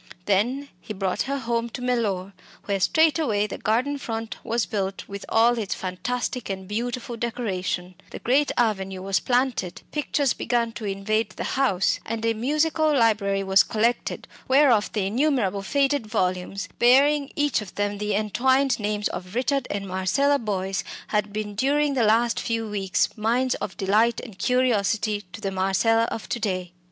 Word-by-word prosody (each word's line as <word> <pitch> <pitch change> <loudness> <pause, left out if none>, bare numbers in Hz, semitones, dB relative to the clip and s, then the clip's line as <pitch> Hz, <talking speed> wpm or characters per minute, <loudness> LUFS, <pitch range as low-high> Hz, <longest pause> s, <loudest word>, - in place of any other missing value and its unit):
Then 245 +8 +1
he 215 - -7
brought 190 -1 -1
her 280 - 0
home 235 -2 -1
to 245 - -7
Mellor, 205 -6 -1 0.3
where 200 -1 0
straightway 300 - +3
the 210 - -6
garden 255 +7 0
front 225 -3 -5
was 235 -1 0
built 195 -2 -3
with 200 0 -7
all 235 +1 +4
its 205 -3 -2
fantastic 240 +6 -3
and 190 -1 -5
beautiful 240 +3 -3
decoration, 190 -6 -3 0.2
the - - -7
great 275 +4 +2
avenue 195 -5 0
was 195 0 +1
planted, 245 -8 -1
pictures 285 -2 0
began 235 -1 0
to 225 -1 -7
invade 205 +3 -1
the - - -6
house, 225 -9 +2
and 225 0 -4
a 230 - +2
musical 305 +6 +1
library 210 -7 +2
was 190 +1 +5
collected 230 +2 -1 0.2
whereof 260 -6 +4
the 205 -3 0
innumerable 225 -3 +1
faded 275 +2 +1
volumes, 185 -2 -1
bearing 280 +4 +5
each 290 -6 +1
of 200 -3 -10
them 205 0 -1
the 210 -1 -1
entwined 260 +6 +2
names 210 0 -1
of 180 +3 -7
Richard 265 +1 0
and 200 -1 -3
Marcella 195 +11 +1
Boyce, 195 -3 -2 0.3
had 210 -1 0
been 210 0 -4
during 280 +6 +1
the 260 - +1
last 230 +2 +3
few 225 -1 -2
weeks 195 -3 0
mines 240 +4 +1
of 195 - -5
delight 215 +4 +2
and 215 -7 -10
curiosity 215 -3 +1
to - - -8
the 195 - -2
Marcella 195 +5 +2
of 225 - -5
to 240 - -2
day. 185 -5 -2
225 Hz, 165 wpm, -24 LUFS, 195-250 Hz, 0.3 s, was